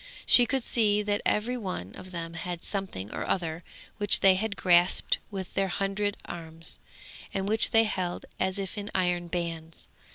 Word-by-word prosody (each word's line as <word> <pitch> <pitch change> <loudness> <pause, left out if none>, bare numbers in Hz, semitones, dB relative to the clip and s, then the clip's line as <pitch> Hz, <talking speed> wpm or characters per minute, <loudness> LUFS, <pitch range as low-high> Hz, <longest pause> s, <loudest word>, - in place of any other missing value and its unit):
She 245 -1 +7
could 265 0 0
see 210 -3 +2
that 205 0 0
every 240 +4 +1
one 180 - -5
of 185 - -10
them 170 -2 -5
had 175 0 -5
something 190 - -4
or - - -3
other, 170 -2 -2 0.4
which 205 -1 +3
they 195 -1 +7
had 205 +2 -1
grasped 175 -1 +4
with 190 -3 -6
their 195 0 +1
hundred 195 +2 -1
arms, 165 -1 -6 0.6
and 195 0 -1
which 220 +2 +4
they 225 0 +5
held 185 -5 -2
as 190 +1 0
if 195 +1 -4
in 205 0 -5
iron 180 -2 +1
bands. 165 -2 -4
190 Hz, 170 wpm, -28 LUFS, 175-205 Hz, 0.6 s, She